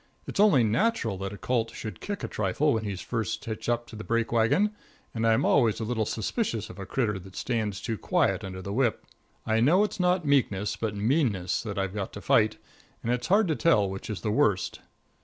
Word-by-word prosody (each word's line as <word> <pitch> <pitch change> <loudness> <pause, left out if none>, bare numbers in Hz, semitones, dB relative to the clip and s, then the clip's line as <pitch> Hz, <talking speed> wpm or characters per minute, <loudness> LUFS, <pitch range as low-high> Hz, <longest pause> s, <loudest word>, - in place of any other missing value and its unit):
It's - - -5
only 200 - +6
natural 115 - +1
that 95 0 -4
a 100 - -8
colt 115 -1 -1
should 110 - -7
kick 205 -1 -4
a - - -1
trifle 110 +9 +1
when 110 -1 -1
he's 100 -3 -4
first 115 +3 -3
hitched 110 0 -4
up 120 0 0
to 120 - -12
the 110 - -7
break 115 0 0
wagon, 120 - +3 0.4
and 115 0 0
I'm 115 +5 +3
always 115 -6 +3
a - - -2
little 110 -1 -1
suspicious 115 - -2
of - - -12
a 95 - -6
critter 105 -7 0
that 95 +1 -13
stands 110 -5 -2
too 115 -4 -4
quiet - - +1
under 95 -1 -6
the 100 - -4
whip. 120 -1 0 0.4
I 110 0 +2
know 165 - +5
it's 205 -1 -3
not 180 -1 +2
meekness, 105 -8 +1
but 110 -2 -3
meanness, 105 - +1
that 110 -4 -5
I've 95 -1 -1
got 100 -2 -4
to - - -6
fight, 110 -1 +3 0.5
and 120 - +1
it's 125 0 -2
hard 205 +2 +4
to 155 - +2
tell 105 -13 +3
which 95 +3 -6
is 105 - -4
the 105 - -1
worst. 105 -3 +1
115 Hz, 220 wpm, -27 LUFS, 105-130 Hz, 0.5 s, only